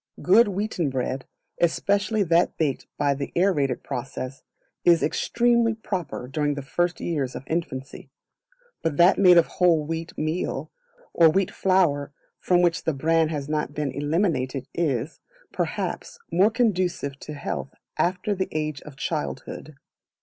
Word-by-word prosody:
Good 210 +6 +6
wheaten 195 -5 -1
bread, 130 0 -3 0.3
especially 200 +5 +1
that 170 -1 +2
baked 145 -5 -1
by 145 -1 +2
the 140 0 -5
aerated 150 -9 +1
process, 130 +2 -5 0.4
is 170 -2 +5
extremely 235 +6 +2
proper 180 - -4
during 145 +1 -1
the 140 - -5
first 175 +7 -1
years 145 -7 -2
of - - -6
infancy; 145 -5 -4 0.7
but 160 -3 -1
that 175 +2 +5
made 180 -3 +7
of 170 - +6
whole 170 -4 +2
wheat 165 +2 -5
meal, 155 +3 -2 0.4
or 165 -1 +6
wheat 190 +4 +1
flour 165 -7 +2 0.3
from 180 -1 +3
which 170 -1 +1
the 160 - +1
bran 160 +3 +2
has 145 -3 -4
not 150 -1 -2
been 150 -3 -1
eliminated 145 -3 -1
is, 145 -3 -1 0.3
perhaps, - - -3
more 195 +4 +4
conducive 185 - 0
to 150 - -8
health 140 -1 -5 0.2
after 180 +5 0
the 190 -1 -2
age 155 -2 -3
of 150 -3 -12
childhood. 155 0 -4
160 Hz, 140 wpm, -25 LUFS, 140-180 Hz, 0.7 s, made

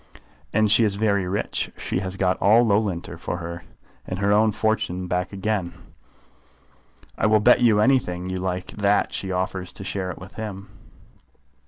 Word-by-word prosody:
"And 110 0 +2
she 115 - +6
is 105 -3 +1
very 100 -3 +1
rich. 100 +3 -2
She - - -2
has 95 0 -4
got 95 -1 +2
all 110 +5 +5
Loughlinter 100 -5 -1
for - - -4
her 85 -1 -5
life, 85 - -15 0.4
and 95 - -4
her 100 +1 +1
own 110 +1 +4
fortune 110 -4 -1
back 90 +1 -2
again. 100 -3 -2 1.5
I - - +3
will 110 0 +4
bet 125 +4 +5
you 110 -4 +4
anything 105 -8 +1
you 95 0 -3
like 90 0 -3
that 100 0 +1
she 95 - -3
offers 95 0 -2
to - - -7
share 95 -1 -3
it 90 - -6
with 90 - -11
him." 100 -2 -7
100 Hz, 175 wpm, -23 LUFS, 90-105 Hz, 1.5 s, she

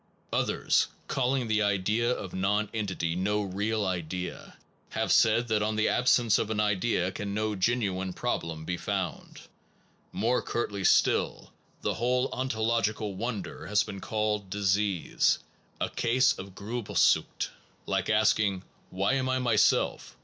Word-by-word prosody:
Others, - - +2 0.2
calling 130 -1 0
the 110 -1 +2
idea 105 +3 +1
of 100 -7 -3
nonentity 100 -3 -1
no 105 +3 0
real 105 +2 -1
idea, 90 -1 -4 0.3
have - - -1
said 115 +2 +4
that 110 -1 +2
on 105 +1 0
the 110 0 +2
absence 120 -3 +3
of 110 - -1
an 110 -1 -1
idea 100 -2 +1
can 100 0 -4
no 110 0 0
genuine 95 -3 0
problem 80 -3 -3
be 90 +1 -2
founded. 95 -3 -4 0.7
More 120 +3 +1
curtly 100 -4 -3
still, - - +2 0.3
the - - 0
whole 125 +2 +1
ontological 110 -4 -1
wonder 110 +1 -5
has 105 0 +3
been 100 - -7
called 105 -2 -1
diseased, 100 -2 +1 0.4
a - - 0
case 120 +2 +3
of 95 0 -9
Grilbelsucht 110 +3 +1 0.4
like - - -1
asking, 100 -3 +2 0.3
Why 95 +6 0
am 130 -1 0
I 130 - +1
myself? 120 -4 +1
105 Hz, 135 wpm, -28 LUFS, 95-115 Hz, 0.7 s, said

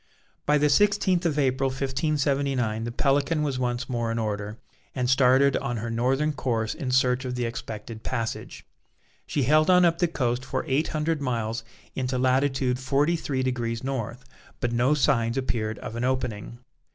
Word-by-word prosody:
By 150 - +4
the 150 0 +3
sixteenth 190 -1 +3
of 150 -3 -1
April, 135 -1 +1
1579, 135 -4 0
the 120 - -3
Pelican 145 +5 +1
was 140 -3 -1
once 125 0 -1
more 120 -3 -1
in 115 - -2
order, 105 -1 -3 0.4
and 125 -2 0
started 130 +1 +4
on 120 -4 -3
her 115 +1 -4
northern 135 +6 +1
course 115 -6 -1
in 140 -6 -5
search 125 0 +2
of 125 -1 -4
the 125 -1 -1
expected 110 -1 -6
passage. 115 -3 -4 0.6
She 145 - 0
held 155 +5 +4
on 180 -1 +6
up 170 -1 +2
the 175 - +3
coast 125 -5 -1
for - - -3
eight 140 +4 +1
hundred 155 0 -1
miles 115 -3 -2 0.3
into 130 -1 -2
latitude 130 0 +1
forty 140 +5 +1
three 135 -5 -2
degrees 120 -2 -2
North, 130 -1 -4 0.3
but 120 - -1
no 125 +5 +2
signs 125 -4 +2
appeared 110 -5 -1
of 115 - -7
an 120 - -3
opening. 125 -4 -2
130 Hz, 170 wpm, -26 LUFS, 120-140 Hz, 0.6 s, on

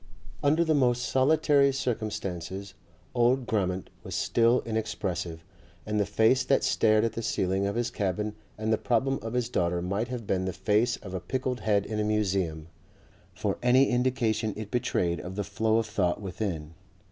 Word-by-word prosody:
Under 155 +4 +3
the 160 - +2
most 125 -4 +2
solitary 140 +1 +3
circumstances 100 -6 -3 0.4
old 125 +1 +3
Grammont 95 -5 -1
was - - -6
still 120 +2 +3
inexpressive, 100 -7 -3 0.4
and 105 0 -1
the 100 - +1
face 110 +5 +3
that 135 +1 +2
stared 110 -1 +3
at 115 -1 0
the 115 - -4
ceiling 95 -2 0
of 100 - -2
his 120 0 -1
cabin 105 +1 -2 0.2
and 110 +1 0
the 110 - +1
problem 130 +3 +1
of 115 +1 -5
his 125 -2 0
daughter 90 -7 0
might 100 +6 -2
have 125 -2 -5
been 95 -1 0
the 95 - -2
face 105 +6 +1
of 95 - -10
a 95 - -2
pickled 125 +7 -2
head 100 -1 +1
in 110 -1 -3
a - - +1
museum, 95 -7 0 0.7
for - - -2
any 125 +2 +5
indication 120 -4 0
it 105 -1 -6
betrayed 90 -8 0
of 90 +1 -7
the 105 - -1
flow 110 +3 +1
of 115 - +1
thought 100 -5 0
within. 90 -5 -4
110 Hz, 175 wpm, -28 LUFS, 95-125 Hz, 0.7 s, any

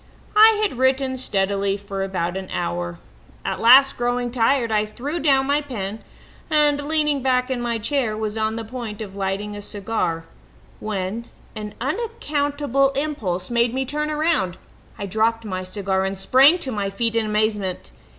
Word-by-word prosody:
"I 435 0 +7
had 380 - -1
written 260 0 +2
steadily 200 -4 +1
for 200 -1 -6
about 185 -2 -2
an 190 -1 -5
hour. 85 0 -3 0.5
At - - -2
last, 265 +4 +7
growing 245 0 -1
tired, 240 0 +2
I 210 -1 +2
threw 265 +10 -4
down 270 -4 +3
my 285 +2 +2
pen 220 -7 -5 0.5
and, 295 -2 +3
leaning 300 -3 +1
back 255 0 +1
in 250 -2 -1
my 235 -1 -1
chair, 230 -1 0
was 215 -1 -3
on 220 0 -1
the 225 0 -5
point 225 -3 -6
of 195 -2 -10
lighting 200 +1 -3
a 205 - -7
cigar 200 -5 -2 0.5
when 210 +2 -3 0.3
an 210 -1 -6
unaccountable 290 - 0
impulse 240 -11 -2
made 235 0 +2
me 265 0 0
turn 300 +3 -2
round. 300 - 0 0.4
I 200 - -4
dropped 220 +3 0
my 185 -3 -3
cigar 190 0 -1
and 195 0 -2
sprang 270 - +6
to 265 - -3
my 205 -3 -2
feet 230 +3 -1
in 225 -1 +2
amazement. 210 - -1
230 Hz, 165 wpm, -22 LUFS, 200-270 Hz, 0.5 s, I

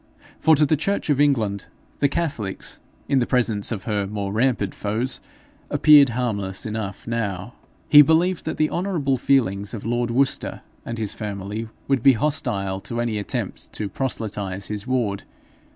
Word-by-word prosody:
For 160 - +5
to 150 +1 +4
the 155 - +2
church 160 +1 -1
of 145 0 +2
England, 110 -9 +1 0.3
the 140 - +3
catholics, 140 - -3 0.3
in 135 - +3
the 120 - 0
presence 115 -5 +1
of 105 -5 -3
her 105 -3 -1
more 100 -1 -4
rampant 110 -4 +1
foes, 110 +6 -2 0.5
appeared 145 -3 +7
harmless 100 -6 -1
enough 105 -3 -5
now. 110 -2 -3 0.3
He 150 - +9
believed 165 +4 +2
that - - -3
the 155 - +1
honourable 170 -8 0
feelings 110 -6 +1
of 105 - -8
lord 120 +1 0
Worcester 135 +3 +1 0.3
and 115 - -4
his 110 -3 -2
family 105 +1 -5 0.2
would 135 -3 +2
be 135 +2 +7
hostile 100 -8 0
to 120 +3 -5
any 115 -3 -1
attempt 100 - -5
to 105 -2 -3
proselytize 100 -5 -3
his 105 +1 -4
ward. 115 -6 0
115 Hz, 160 wpm, -23 LUFS, 100-140 Hz, 0.5 s, He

